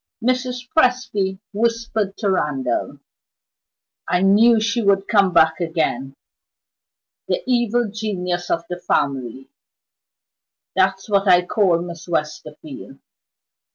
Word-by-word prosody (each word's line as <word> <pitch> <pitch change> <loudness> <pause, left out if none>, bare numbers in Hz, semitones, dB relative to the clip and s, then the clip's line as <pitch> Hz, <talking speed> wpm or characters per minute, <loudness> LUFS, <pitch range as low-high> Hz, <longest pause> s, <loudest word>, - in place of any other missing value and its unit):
Mrs. 255 0 -1
Presty 245 -9 +1 0.2
whispered 225 -2 -1
to 205 -4 0
Randal: 135 -9 -2 1.1
"I 180 +1 +1
knew 220 +4 +5
she 230 +2 0
would 200 -2 +2
come 200 -4 +3
back 160 -1 +3
again! 160 -6 -2 1.1
The - - -1
Evil 240 -2 +1
Genius 180 -5 -3
of 170 - 0
the 175 0 -6
family 135 -5 -2 1.2
that's 190 0 +1
what 200 -1 +1
I 180 -1 +5
call 180 -4 +1
Miss 170 0 -9
Westerfield. 150 -3 -5
190 Hz, 105 wpm, -20 LUFS, 165-220 Hz, 1.2 s, knew